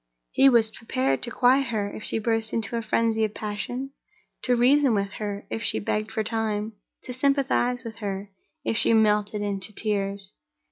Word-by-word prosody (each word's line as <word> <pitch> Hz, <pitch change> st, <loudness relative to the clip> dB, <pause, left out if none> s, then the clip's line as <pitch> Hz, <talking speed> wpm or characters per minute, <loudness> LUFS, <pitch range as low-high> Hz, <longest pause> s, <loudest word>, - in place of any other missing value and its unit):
He 270 Hz, -, +6 dB
was 230 Hz, -3 st, +4 dB
prepared 135 Hz, -, -1 dB
to -, -, -2 dB
quiet 255 Hz, +3 st, +3 dB
her, 215 Hz, -4 st, -1 dB
if -, -, -7 dB
she -, -, -1 dB
burst 225 Hz, 0 st, -1 dB
into 225 Hz, 0 st, -2 dB
a 230 Hz, -, -1 dB
frenzy 225 Hz, 0 st, +1 dB
of 215 Hz, -1 st, -1 dB
passion; 230 Hz, +6 st, -4 dB, 0.5 s
to 250 Hz, -, +2 dB
reason 260 Hz, +1 st, +4 dB
with 200 Hz, -1 st, -1 dB
her, 205 Hz, -1 st, -4 dB
if 110 Hz, 0 st, -3 dB
she -, -, +1 dB
begged 215 Hz, -, -2 dB
for 220 Hz, -1 st, -1 dB
time; 220 Hz, -1 st, -2 dB, 0.3 s
to 250 Hz, -, -6 dB
sympathize 260 Hz, -2 st, +1 dB
with 225 Hz, -2 st, -8 dB
her, 200 Hz, -2 st, -5 dB, 0.3 s
if -, -, 0 dB
she 230 Hz, -, +4 dB
melted 210 Hz, -1 st, +2 dB
into 200 Hz, 0 st, -3 dB
tears. 200 Hz, -2 st, -2 dB
220 Hz, 180 wpm, -25 LUFS, 205-235 Hz, 0.5 s, He